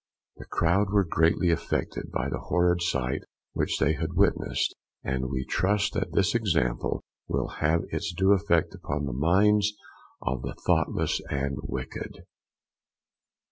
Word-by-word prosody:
The -, -, -10 dB
crowd 95 Hz, +5 st, +2 dB
were 100 Hz, 0 st, +4 dB
greatly 85 Hz, +2 st, +3 dB
affected 85 Hz, -, -2 dB
by -, -, -1 dB
the -, -, -3 dB
horrid 90 Hz, +1 st, +2 dB
sight 65 Hz, -6 st, 0 dB, 0.3 s
which -, -, 0 dB
they 70 Hz, +4 st, +3 dB
had 75 Hz, -, -3 dB
witnessed, -, -, +1 dB, 0.3 s
and 65 Hz, -1 st, -1 dB
we 65 Hz, -2 st, -2 dB
trust 100 Hz, +3 st, +1 dB
that 95 Hz, -3 st, -2 dB
this 100 Hz, +1 st, +3 dB
example 90 Hz, -, 0 dB, 0.2 s
will -, -, -1 dB
have 80 Hz, +2 st, +3 dB
its -, -, -2 dB
due 95 Hz, +3 st, +3 dB
effect 85 Hz, -4 st, +2 dB
upon 75 Hz, 0 st, -3 dB
the 65 Hz, -, -3 dB
minds 100 Hz, +9 st, +3 dB, 0.5 s
of 65 Hz, -1 st, -1 dB
the 65 Hz, -, -5 dB
thoughtless -, -, +1 dB
and 70 Hz, 0 st, -1 dB
wicked. 65 Hz, -3 st, -6 dB
85 Hz, 140 wpm, -27 LUFS, 70-95 Hz, 0.5 s, were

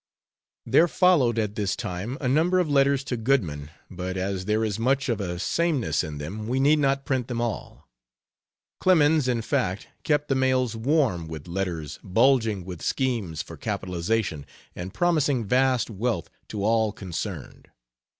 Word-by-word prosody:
There 170 Hz, -, +5 dB
followed 155 Hz, -, +3 dB
at 105 Hz, -2 st, 0 dB
this 100 Hz, -2 st, -1 dB
time 95 Hz, +9 st, -4 dB
a 130 Hz, -, -2 dB
number 160 Hz, +8 st, +3 dB
of 180 Hz, -3 st, +2 dB
letters 140 Hz, -1 st, +3 dB
to 130 Hz, -, -3 dB
Goodman, 95 Hz, -, 0 dB, 0.2 s
but 95 Hz, 0 st, -5 dB
as 95 Hz, 0 st, -2 dB
there 110 Hz, +2 st, +1 dB
is 105 Hz, -1 st, -2 dB
much 135 Hz, +3 st, +1 dB
of 115 Hz, -3 st, 0 dB
a 90 Hz, -2 st, -3 dB
sameness 150 Hz, -, 0 dB
in 75 Hz, -3 st, -6 dB
them, 100 Hz, +9 st, -6 dB
we 130 Hz, +3 st, 0 dB
need 150 Hz, +3 st, +4 dB
not 135 Hz, -1 st, +1 dB
print 130 Hz, -3 st, -1 dB
them 120 Hz, -2 st, -3 dB
all. 120 Hz, -3 st, -4 dB, 0.9 s
Clemens, 160 Hz, -5 st, +4 dB
in 120 Hz, -3 st, 0 dB
fact, 95 Hz, -2 st, -1 dB
kept 150 Hz, -1 st, +1 dB
the -, -, +1 dB
mails 130 Hz, -3 st, +1 dB
warm 115 Hz, -, +1 dB
with 80 Hz, -1 st, -8 dB
letters 85 Hz, -5 st, -4 dB
bulging 110 Hz, -2 st, +2 dB
with 90 Hz, -3 st, -7 dB
schemes 115 Hz, -, -1 dB
for -, -, -11 dB
capitalization, 90 Hz, -3 st, -2 dB, 0.3 s
and 90 Hz, +2 st, -6 dB
promising 150 Hz, -, +1 dB
vast 125 Hz, +1 st, +2 dB
wealth 110 Hz, -3 st, -2 dB, 0.2 s
to 100 Hz, -2 st, -4 dB
all 110 Hz, -1 st, +2 dB
concerned. 95 Hz, -5 st, -6 dB
115 Hz, 160 wpm, -25 LUFS, 95-135 Hz, 0.9 s, There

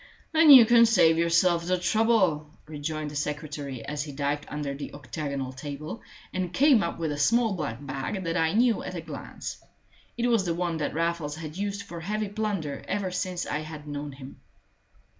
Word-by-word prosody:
"Then 320 Hz, -1 st, +5 dB
you 260 Hz, -5 st, +11 dB
can 235 Hz, 0 st, +6 dB
save 165 Hz, -7 st, +4 dB
yourself 170 Hz, +1 st, +3 dB
the 185 Hz, 0 st, +2 dB
trouble," 185 Hz, -5 st, +2 dB, 0.2 s
rejoined 155 Hz, 0 st, -4 dB
the -, -, -9 dB
secretary, 145 Hz, -4 st, -4 dB
as 150 Hz, 0 st, -3 dB
he 145 Hz, 0 st, -5 dB
dived 145 Hz, +1 st, -2 dB
under 145 Hz, -1 st, -4 dB
the 140 Hz, +1 st, -7 dB
octagonal 140 Hz, -1 st, -4 dB
table, 145 Hz, -, -7 dB, 0.3 s
and 185 Hz, -2 st, -2 dB
came 275 Hz, 0 st, +5 dB
up 170 Hz, -, -2 dB
with 165 Hz, -2 st, -2 dB
a 145 Hz, -, -4 dB
small 230 Hz, +7 st, +3 dB
black 145 Hz, -6 st, -4 dB
bag 135 Hz, +8 st, -4 dB
that 165 Hz, -1 st, -2 dB
I 160 Hz, -1 st, +2 dB
knew 235 Hz, 0 st, +3 dB
at 185 Hz, -, -6 dB
a 170 Hz, -, -4 dB
glance. 155 Hz, -3 st, -8 dB, 0.5 s
It 240 Hz, -, 0 dB
was 230 Hz, -5 st, +3 dB
the 170 Hz, -2 st, -1 dB
one 170 Hz, -1 st, -1 dB
that 150 Hz, -1 st, -3 dB
Raffles 165 Hz, -3 st, -1 dB
had 155 Hz, -1 st, -7 dB
used 200 Hz, +1 st, -3 dB
for 170 Hz, -, -8 dB
heavy 210 Hz, +4 st, -2 dB
plunder 200 Hz, -9 st, -3 dB
ever 195 Hz, -2 st, -2 dB
since 180 Hz, -1 st, -2 dB
I 150 Hz, -, -2 dB
had 155 Hz, -1 st, -8 dB
known 145 Hz, 0 st, -5 dB
him. 135 Hz, 0 st, -12 dB
165 Hz, 190 wpm, -27 LUFS, 145-195 Hz, 0.5 s, you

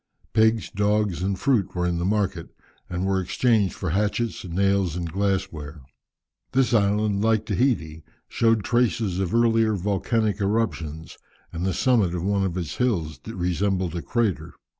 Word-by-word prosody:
Pigs, 110 Hz, 0 st, +2 dB
dogs, 105 Hz, -3 st, 0 dB
and 95 Hz, +1 st, -1 dB
fruit 100 Hz, -9 st, +1 dB
were 90 Hz, 0 st, 0 dB
in 85 Hz, -1 st, 0 dB
the 85 Hz, -, -1 dB
market, 95 Hz, -4 st, -1 dB, 0.4 s
and 90 Hz, +1 st, -2 dB
were 95 Hz, -1 st, +1 dB
exchanged 105 Hz, +1 st, +1 dB
for 95 Hz, -4 st, -3 dB
hatchets, 105 Hz, +5 st, -1 dB
nails, 95 Hz, -1 st, +1 dB
and 85 Hz, -2 st, -4 dB
glass 95 Hz, -1 st, 0 dB
ware. 75 Hz, -1 st, -9 dB, 0.7 s
This 130 Hz, -1 st, +2 dB
island, 105 Hz, -1 st, +2 dB
like 110 Hz, -1 st, +2 dB
Tahiti, 100 Hz, -, 0 dB, 0.2 s
showed 115 Hz, -2 st, +2 dB
traces 115 Hz, -6 st, +1 dB
of 95 Hz, -2 st, -1 dB
earlier 115 Hz, -2 st, +3 dB
volcanic 105 Hz, +2 st, 0 dB
eruptions, 90 Hz, -7 st, -2 dB, 0.3 s
and 85 Hz, +2 st, -2 dB
the 95 Hz, -, 0 dB
summit 110 Hz, -9 st, +2 dB
of 85 Hz, -, -3 dB
one 100 Hz, 0 st, +1 dB
of 95 Hz, -2 st, -2 dB
its 85 Hz, -4 st, -4 dB
hills 90 Hz, -12 st, -1 dB
resembled 95 Hz, -2 st, -1 dB
a 85 Hz, -, -2 dB
crater. 115 Hz, -4 st, -1 dB
100 Hz, 155 wpm, -24 LUFS, 90-110 Hz, 0.7 s, earlier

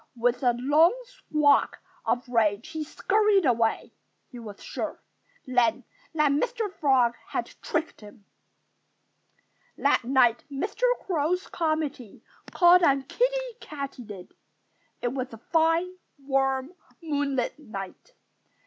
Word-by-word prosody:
With 240 Hz, +2 st, 0 dB
a 245 Hz, -2 st, +3 dB
loud 300 Hz, -, +4 dB
squawk 305 Hz, -, +1 dB, 0.3 s
of 245 Hz, +1 st, 0 dB
rage 225 Hz, +1 st, +1 dB
he 315 Hz, -1 st, -4 dB
scurried 410 Hz, +4 st, +2 dB
away. 230 Hz, -3 st, +1 dB, 0.4 s
He 245 Hz, -, -9 dB
was 210 Hz, -3 st, -10 dB
sure, -, -, -5 dB, 0.5 s
then, 245 Hz, -3 st, +1 dB, 0.3 s
that 300 Hz, -2 st, +3 dB
Mr. 440 Hz, +6 st, -1 dB
Frog 265 Hz, -8 st, +3 dB
had -, -, -2 dB, 0.2 s
tricked 325 Hz, -, -3 dB
him. 210 Hz, 0 st, -14 dB, 1.5 s
That 280 Hz, -2 st, +2 dB
night 240 Hz, -2 st, +3 dB
Mr. 395 Hz, -, -4 dB, 0.2 s
Crow's 355 Hz, +1 st, 0 dB
committee 310 Hz, -, -3 dB, 0.3 s
called 355 Hz, 0 st, +6 dB
on 275 Hz, -5 st, +3 dB
Kiddie -, -, -1 dB
Katydid. 250 Hz, -10 st, -8 dB, 0.7 s
It 240 Hz, -, +1 dB
was 260 Hz, -1 st, -4 dB
a -, -, -8 dB
fine, 330 Hz, +7 st, +1 dB, 0.2 s
warm, 270 Hz, +1 st, -1 dB, 0.3 s
moonlight 285 Hz, -4 st, -1 dB
night. 215 Hz, -, -9 dB
280 Hz, 110 wpm, -26 LUFS, 245-330 Hz, 1.5 s, called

